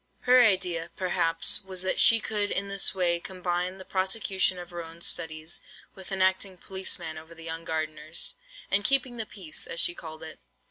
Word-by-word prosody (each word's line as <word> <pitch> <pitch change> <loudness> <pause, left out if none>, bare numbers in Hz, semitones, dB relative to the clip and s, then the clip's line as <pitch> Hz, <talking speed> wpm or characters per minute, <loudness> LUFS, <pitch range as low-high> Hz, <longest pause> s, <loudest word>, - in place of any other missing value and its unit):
Her 250 0 +6
idea, 180 -6 +2
perhaps, 175 +1 +1
was, 190 -1 -4
that 185 - +1
she 230 - +7
could 210 -1 -1
in 200 +1 -1
this 200 +1 +2
way 175 -2 +2
combine 180 0 -3
the 190 - -10
prosecution 190 -1 +2
of 175 0 -9
her 175 -1 -5
own 165 +1 -12
studies, 155 -1 -1 0.3
with 190 +1 -11
enacting 190 0 +1
policeman 185 -4 -4
over 160 +1 -14
the 165 - -12
young 165 0 -5
gardeners, 155 0 -3 0.4
and 200 +1 +4
"keeping 260 -1 +2
the 220 -2 -3
peace," 180 -7 -5
as 165 - -1
she 175 - +6
called 160 -2 -10
it. 160 - -9
185 Hz, 180 wpm, -27 LUFS, 165-195 Hz, 0.4 s, she